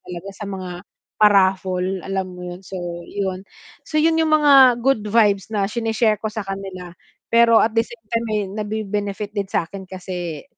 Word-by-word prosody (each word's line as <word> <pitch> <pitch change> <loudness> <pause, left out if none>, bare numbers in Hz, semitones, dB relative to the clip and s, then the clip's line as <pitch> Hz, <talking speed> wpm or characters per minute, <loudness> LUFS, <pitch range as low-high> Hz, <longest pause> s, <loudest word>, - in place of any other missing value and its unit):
talaga 180 +2 -8
sa 210 - -8
mga 185 -2 -6 0.5
pa-raffle 190 -2 +2
alam 195 -1 -2
mo 180 0 -9
yun, 180 0 -7
so 190 0 -9 0.3
yun, 190 -2 -3 0.5
so 310 - -3
yun 325 +1 +3
yung 320 - +2
mga 275 -5 +7
good 270 -4 +3
vibes 205 -3 +3
na 210 -3 0
sine-share 220 0 0
ko 220 - -2
sa 215 -1 -5
kanila 195 -2 -7 0.4
pero 230 0 +6
at 220 - +2
the 225 - +3
same 235 -2 -14
time 230 +1 -1
eh, 210 - 0
nabe-benefit 210 -1 -3
din 200 -2 -3
sa'kin 190 +1 -3
kasi 180 -4 -6
200 Hz, 170 wpm, -21 LUFS, 190-225 Hz, 0.5 s, mga